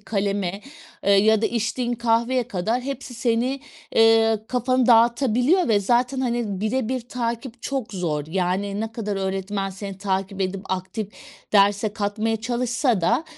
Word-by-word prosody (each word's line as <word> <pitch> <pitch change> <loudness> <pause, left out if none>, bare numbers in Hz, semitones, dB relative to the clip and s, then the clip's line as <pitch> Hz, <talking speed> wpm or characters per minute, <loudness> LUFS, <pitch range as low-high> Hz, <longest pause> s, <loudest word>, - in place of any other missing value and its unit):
kaleme, 200 -2 -2 0.4
eee, 200 - +4
ya 215 +2 +4
da - - +4
içtiğin 240 +2 -1
kahveye 235 +1 +1
kadar 220 +7 -1
hepsi 270 -1 -6
seni, 245 +3 0 0.3
eee, 225 -1 +5
kafanı 255 0 +1
dağıtabiliyor 245 - +4
ve 210 -3 +3
zaten, 245 +5 +1
hani, 235 -6 -1
bire 225 +2 -1
bir 260 0 -1
takip 235 0 -4
çok 260 -6 -3
zor 155 -6 -2
yani 190 +3 -1
ne 225 0 -4
kadar 210 -3 -3
öğretmen 195 +1 -2
seni 195 0 -7
takip 195 0 -2
edip 190 0 -1
aktif 190 +3 -3 0.4
derse 205 +1 +4
katmaya 215 +1 -1
çalışsa 240 -1 0
da, 175 - +1
225 Hz, 145 wpm, -23 LUFS, 195-240 Hz, 0.4 s, eee